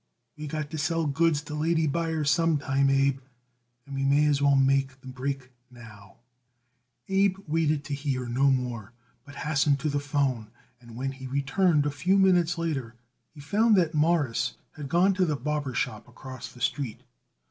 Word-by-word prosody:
We 150 0 -7
got 150 0 -4
to 160 - -4
sell 165 +2 0
goods 150 +1 +1
to 150 - -8
lady 160 +1 +1
buyers 160 -1 0
some 165 -2 +2
time, 140 -1 +1
Abe, 135 0 +2 0.7
and 140 - -10
we 135 0 -2
may 140 +2 +3
as 145 -2 +2
well 140 -1 +4
make 135 -1 +2
the 130 - -13
break 130 0 -5 0.2
now." 110 -5 -14 0.9
Abe 195 0 +2
waited 155 -1 0
to 140 - -5
hear 140 -3 -2
no 130 +4 +2
more, 125 -5 -2 0.3
but 145 -1 -13
hastened 145 -1 +1
to 155 - 0
the 145 0 0
'phone, 140 -6 -1 0.3
and 120 -1 -13
when 135 +3 -3
he 130 -1 -9
returned 145 +4 +1
a 145 - 0
few 180 +7 +1
minutes 180 -3 +3
later 140 -9 -3 0.4
he 145 - -11
found 210 +9 +3
that 170 -4 +2
Morris 150 -7 +1 0.2
had 145 -3 -8
gone 180 +5 +3
to 185 0 +1
the 155 -4 0
barber 145 -1 -3
shop - - -3
across 130 -1 -9
the 125 -1 -15
street. 125 -3 -2
145 Hz, 180 wpm, -27 LUFS, 135-160 Hz, 0.9 s, well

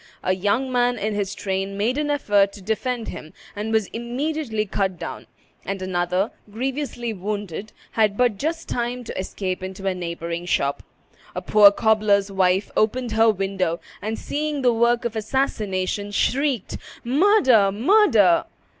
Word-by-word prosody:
A 185 - +2
young 205 +8 0
man 245 0 +2
in 215 +1 -2
his 205 -1 -2
train 195 +1 -3
made 225 +5 +1
an 295 0 -1
effort 205 -9 +2
to 205 - -11
defend 230 +3 -2
him, 155 - -9 0.2
and 210 +2 -3
was 220 -2 +2
immediately 240 -1 -2
cut 190 -2 -1
down; - - -7 0.4
and 195 0 -4
another, 185 +2 -1 0.2
grievously 245 0 -3
wounded, 205 0 -5 0.2
had 210 -2 +2
but 240 -5 +2
just 325 +2 -2
time 245 +1 -2
to 235 - -7
escape 185 0 -3
into 190 +1 -7
a 190 - +1
neighboring 170 -1 -5
shop. 140 -4 0 0.5
A - - -2
poor 205 -1 +7
cobbler's 210 -2 +2
wife 190 0 +1
opened 240 +2 +1
her 225 +1 +4
window, 190 -4 -1 0.2
and, 220 +1 -3
seeing 295 -1 -3
the 245 -1 +4
work 235 +1 +2
of 235 -1 -2
assassination, 205 -4 -1
shrieked, 255 +2 0 0.3
"Murder! 260 - +4
murder!" 225 - +4
215 Hz, 150 wpm, -23 LUFS, 195-245 Hz, 0.5 s, poor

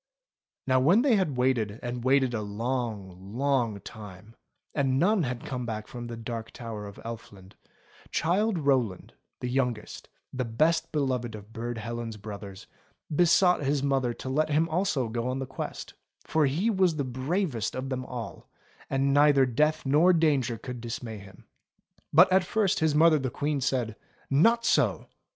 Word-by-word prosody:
Now 130 -1 +3
when 175 - +4
they 270 -5 +4
had 180 -10 0
waited 120 -4 +1
and 120 0 -4
waited 130 -1 +3
a 110 - -1
long, 105 -3 -4
long 130 -6 +1
time, 105 +1 -11 0.4
and 135 -3 +1
none 195 +6 +3
had 125 -5 -3
come 125 -2 -4
back 110 -2 -4
from 120 +1 -8
the 120 -1 -6
Dark 115 0 -5
Tower 110 -3 -7
of 100 - -11
Elfland, 100 -4 -9 0.6
Childe 195 +5 +1
Rowland, 130 - 0 0.3
the 125 - -2
youngest, 125 -4 -2 0.2
the 130 -1 -1
best 155 +9 +1
beloved 130 -6 -1
of 105 +1 -12
Burd 120 +1 -4
Helen's 115 0 -5
brothers, 100 -2 -9 0.5
besought 180 +1 +4
his 140 0 0
mother 135 -3 +1
to - - -8
let 155 +4 +1
him 155 +2 +2
also 160 -7 0
go 115 +2 -3
on 130 +1 -1
the 135 - -3
quest; 130 - -6 0.3
for 155 -2 +2
he 175 +12 +1
was 185 -5 +2
the 145 - -1
bravest 130 - -2
of 130 +1 -4
them 130 -1 -3
all, 115 -5 -7 0.4
and 135 0 +1
neither 145 -2 +5
death 150 +6 +1
nor 155 +7 +5
danger 145 -8 +2
could 125 +1 -7
dismay 115 -2 -6
him. 100 -1 -15 0.7
But 180 +5 +6
at 190 0 +5
first 200 +1 +1
his 160 -2 +2
mother 160 0 +5
the 130 -1 -2
Queen 145 +2 -2
said: 125 -4 -1 0.4
"Not 230 +12 +4
so! - - +2
130 Hz, 165 wpm, -28 LUFS, 115-150 Hz, 0.7 s, But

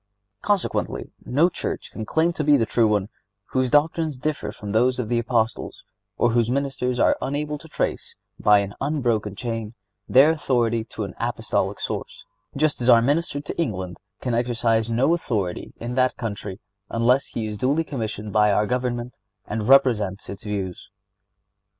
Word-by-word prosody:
Consequently, 205 -3 -1 0.2
no 145 +7 +4
church 175 - -4
can 110 -1 -6
claim 165 +2 +2
to 155 - -2
be 145 -1 +5
the 115 - +2
true 115 +1 +3
one 105 -1 +1 0.4
whose 130 -1 +1
doctrines 155 +1 +2
differ 155 +3 -2
from 105 -1 -7
those 125 +4 +3
of 120 -4 -3
the 120 -1 +2
Apostles, 115 -1 -1 0.3
or 120 - +3
whose 115 -1 +2
ministers 130 -2 -1
are - - +4
unable 150 +2 -2
to 160 - -13
trace, 150 - -3 0.2
by 105 -1 +5
an 100 0 -5
unbroken 115 -9 0
chain, 115 -1 -4 0.3
their 140 +5 +7
authority 120 -7 +1
to 115 - -6
an 100 -3 -6
Apostolic - - -1
source; - - -5 0.3
just 150 -2 +1
as 120 - +2
our 115 -1 +7
Minister 145 +2 0
to 145 - -3
England 95 - -3 0.2
can 125 - -1
exercise 115 -1 +1
no 125 +8 +3
authority 105 - -2
in 120 +1 -4
that 130 0 +2
country 100 -3 -5 0.3
unless 125 +4 +2
he 115 - -4
is 105 -1 -4
duly 135 +9 +1
commissioned 110 -7 -5
by 105 -1 +4
our 105 +1 +2
Government 125 0 -2 0.3
and 105 0 -3
represents 115 -8 +3
its 100 - -8
views. 100 -4 -4
120 Hz, 165 wpm, -24 LUFS, 110-140 Hz, 0.4 s, their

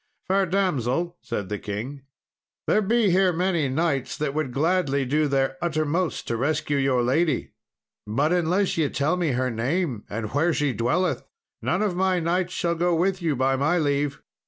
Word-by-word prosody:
"Fair 195 0 +2
damsel," 170 - 0
said 105 -5 -4
the 105 +1 -4
king, 115 +8 -5 0.6
"there 215 - +3
be 215 -1 +2
here 185 +1 +4
many 170 -4 0
knights 140 -2 -1
that 150 -2 -2
would 155 -4 -2
gladly 140 -1 +1
do 150 +4 +1
their 135 -1 0
uttermost 160 +1 -1
to 115 - -1
rescue 145 +3 0
your 135 -3 +2
lady, 145 +4 +1 0.6
but 140 +10 +1
unless 180 +2 +1
ye 150 -3 +2
tell 145 +5 0
me 170 -6 0
her 130 0 0
name, 125 - -1
and 110 0 -4
where 160 +4 +2
she 145 -3 +1
dwelleth, 130 - 0 0.4
none 185 +5 0
of 200 -4 0
my 185 0 +2
knights 175 +2 0
shall 170 -1 0
go 175 +1 +1
with 185 +3 0
you 160 -4 0
by 135 +1 +2
my 145 +6 +1
leave." 145 -2 0
155 Hz, 175 wpm, -25 LUFS, 135-180 Hz, 0.6 s, here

